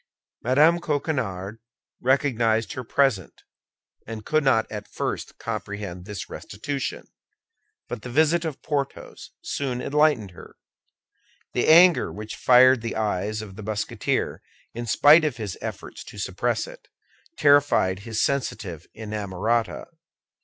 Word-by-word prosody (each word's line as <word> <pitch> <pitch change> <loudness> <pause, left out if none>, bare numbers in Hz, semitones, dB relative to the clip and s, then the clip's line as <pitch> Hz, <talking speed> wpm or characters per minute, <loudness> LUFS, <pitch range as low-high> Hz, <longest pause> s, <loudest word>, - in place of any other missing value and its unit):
Mme. 150 +8 +4
Coquenard 125 - -2 0.4
recognized 120 -3 +1
her 130 -3 -5
present, 120 - 0 0.6
and 110 -1 -7
could 155 -1 +1
not 120 -5 +3
at 105 -1 -6
first - - -4
comprehend 100 -3 -5
this 105 -2 -6
restitution; 135 +6 -5 0.8
but - - -6
the 125 - -8
visit 160 +6 +3
of 160 -4 -5
Porthos 140 -3 -4
soon 130 -3 -3
enlightened 145 -7 +2
her. 90 - -14 1.0
The 120 - 0
anger 170 +2 +6
which 105 +1 -7
fired 130 0 +6
the 115 0 -4
eyes 105 0 -1
of 100 -3 -11
the - - -7
Musketeer, 105 0 -2 0.3
in 120 +1 -5
spite 150 +8 +6
of 150 -6 -1
his 105 -5 -5
efforts - - -7
to - - -12
suppress - - -1
it, - - -13 0.5
terrified 145 -10 +4
his 110 +1 -4
sensitive 100 - -2
inamorata. 110 +1 -2
120 Hz, 125 wpm, -24 LUFS, 105-145 Hz, 1.0 s, anger